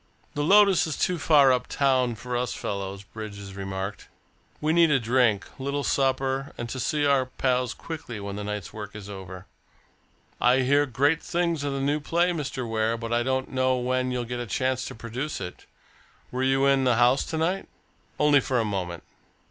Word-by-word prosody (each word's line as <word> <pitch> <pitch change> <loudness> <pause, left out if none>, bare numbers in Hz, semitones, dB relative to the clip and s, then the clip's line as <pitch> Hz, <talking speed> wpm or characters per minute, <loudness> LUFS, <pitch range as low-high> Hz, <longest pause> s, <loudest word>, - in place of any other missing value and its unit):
"The 145 - -2
Lotus 195 +1 +5
is 155 - -3
too 180 -2 0
far 140 -3 +5
up 125 -1 -1
town 130 -4 +1
for 120 +3 -5
us 125 0 -1
fellows," 100 -1 -4
Bridges 100 -2 -8
remarked. 95 +1 -5 0.5
"We 155 +1 +1
need 170 -1 +5
a 140 -2 +3
drink, 115 -4 +2
a - - -7
little 140 +1 -2
supper, 135 0 0
and 120 - -4
to 130 - -4
see 145 +3 0
our 135 -2 +3
pals 125 -1 0
quickly 150 -9 -7
when 100 0 -5
the 105 - -5
night's 105 -2 -5
work 105 -1 -8
is 105 -2 -8
over. 95 -1 -9 1.0
I 125 +2 +4
hear 145 +3 +3
great 140 +5 +2
things 170 -3 -1
of 140 -1 -1
the 135 - -2
new 145 +2 +1
play, 170 +4 +1
Mr. 140 -6 -3
Ware, 110 0 0
but 115 0 -4
I 120 - +2
don't 130 +1 -1
know 130 0 +2
when 130 +1 0
you'll 125 -1 -2
get 120 +1 -4
a 120 - -4
chance 130 +5 -1
to 135 - -7
produce 120 +6 -5
it. 90 - -8 0.6
Were 125 - -2
you 135 +1 +3
in 135 -1 +4
the 125 -2 +3
house 120 +3 +4
tonight?" 165 +4 -1 0.5
"Only 150 -1 +5
for 130 0 -1
a 115 - +1
moment." 90 -5 -3
130 Hz, 195 wpm, -26 LUFS, 110-140 Hz, 1.0 s, Lotus